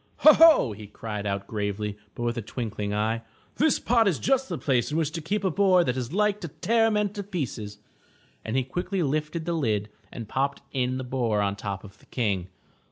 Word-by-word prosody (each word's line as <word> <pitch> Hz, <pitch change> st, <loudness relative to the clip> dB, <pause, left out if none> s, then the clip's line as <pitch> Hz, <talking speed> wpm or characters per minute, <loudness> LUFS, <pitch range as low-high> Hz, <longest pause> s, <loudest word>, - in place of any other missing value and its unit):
"Ho, 305 Hz, -, +10 dB
ho!'' 320 Hz, -, +7 dB
he 105 Hz, 0 st, -9 dB
cried 105 Hz, -1 st, -5 dB
out 100 Hz, 0 st, -2 dB
gravely, 105 Hz, 0 st, -3 dB, 0.2 s
but 120 Hz, -, -4 dB
with 120 Hz, 0 st, 0 dB
a 120 Hz, -, -2 dB
twinkling 105 Hz, -2 st, -4 dB
eye, 110 Hz, +2 st, 0 dB, 0.4 s
''this 310 Hz, 0 st, +3 dB
pot 230 Hz, -2 st, +3 dB
is 175 Hz, -7 st, +2 dB
just 270 Hz, 0 st, +1 dB
the -, -, -2 dB
place 130 Hz, -2 st, 0 dB
in 155 Hz, -, 0 dB
which 155 Hz, -2 st, 0 dB
to 165 Hz, +1 st, -4 dB
keep 200 Hz, +6 st, -2 dB
a 190 Hz, -, +2 dB
boar 185 Hz, 0 st, +4 dB
that 125 Hz, -6 st, -1 dB
is 125 Hz, -1 st, -3 dB
like 210 Hz, +2 st, +1 dB
to 170 Hz, -, -4 dB
tear 225 Hz, +8 st, +2 dB
men 210 Hz, -1 st, +1 dB
to 205 Hz, -, -4 dB
pieces." 135 Hz, -, -4 dB, 0.7 s
And 110 Hz, +4 st, -2 dB
he 130 Hz, -, +2 dB
quickly 180 Hz, +7 st, -2 dB
lifted 155 Hz, +3 st, -2 dB
the 170 Hz, -, -1 dB
lid 110 Hz, -9 st, 0 dB, 0.2 s
and 115 Hz, -3 st, -7 dB
popped 140 Hz, +4 st, -1 dB
in 130 Hz, -1 st, 0 dB
the 130 Hz, -, -4 dB
boar 125 Hz, -4 st, 0 dB
on 100 Hz, 0 st, 0 dB
top 100 Hz, -1 st, -5 dB
of 105 Hz, 0 st, -14 dB
the -, -, -23 dB
King. 100 Hz, -7 st, -1 dB
130 Hz, 220 wpm, -26 LUFS, -, 0.7 s, Ho